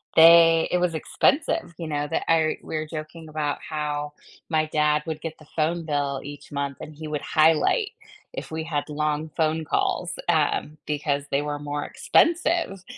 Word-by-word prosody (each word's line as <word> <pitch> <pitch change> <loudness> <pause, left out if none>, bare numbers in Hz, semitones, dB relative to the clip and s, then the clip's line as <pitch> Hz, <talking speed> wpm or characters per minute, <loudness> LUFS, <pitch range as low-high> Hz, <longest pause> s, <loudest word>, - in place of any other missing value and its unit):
they 165 0 +8
it 180 - +3
was 175 -2 0
expensive, 280 - +1
you 165 -2 -5
know, 145 -1 -2
that 165 - -1
I 160 -1 +3
we - - -6
were 155 0 -2
joking 155 0 -8
about 150 -2 -2
how 150 -1 -3 0.4
my 155 -1 +2
dad 150 0 +2
would 155 -1 -4
get 160 -1 -6
the 155 - -16
phone 165 +1 0
bill 140 -3 -1
each 145 +1 -10
month, 140 -1 -3
and 155 - -9
he 155 0 -7
would 150 -1 -3
highlight 165 - +3 0.4
if - - -6
we 160 0 -3
had 155 -2 -3
long 150 +1 -1
phone 160 0 +1
calls, 175 +3 0 0.2
um, 155 -1 +1
because 145 -1 -1
they 140 +1 +2
were 145 0 -3
more 145 0 -3
expensive, 335 - +2
155 Hz, 175 wpm, -25 LUFS, 150-165 Hz, 0.4 s, they